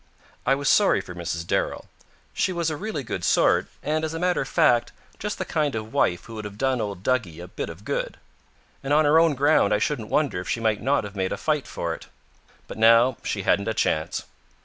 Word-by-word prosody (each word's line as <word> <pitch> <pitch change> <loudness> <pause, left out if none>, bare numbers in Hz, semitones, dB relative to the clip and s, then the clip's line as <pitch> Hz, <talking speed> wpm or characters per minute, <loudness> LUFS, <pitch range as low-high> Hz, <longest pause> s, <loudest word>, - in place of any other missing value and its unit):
I 135 - +5
was 140 0 -3
sorry 205 - +4
for 90 - -8
Mrs. 85 -1 -4
Darrell. - - -1 0.5
She - - 0
was 170 -3 -1
a - - -2
really 195 -4 -4
good 105 -7 -5
sort - - +3 0.2
and, 155 +2 -1
as 160 0 -3
a - - -3
matter 180 0 +1
of - - -4
fact, 120 -8 +3 0.3
just 210 0 -3
the - - -3
kind 150 -5 -1
of 110 0 -5
wife 90 - +1
who 115 - -10
would 110 -1 -6
have 105 0 -8
done 130 0 0
old 100 -3 -5
Duggie 105 -11 -1
a 90 - -8
bit - - -5
of 80 +5 -11
good. - - -3 0.7
And 140 +1 0
on 155 +1 +4
her 150 +2 +5
own 165 -3 +3
ground 140 -7 +3
I - - +2
shouldn't 110 0 -2
wonder 145 -11 +1
if 90 - -8
she - - 0
might 110 -2 0
not 135 +2 +1
have 100 0 -8
made 95 -1 -1
a - - -2
fight 150 -3 -1
for 85 -1 -3
it. - - -10 0.6
But - - -8
now 115 +3 +5
she 100 - -3
hadn't 100 +2 +2
a 110 - -1
chance. 80 -7 0
120 Hz, 235 wpm, -24 LUFS, 100-150 Hz, 0.7 s, I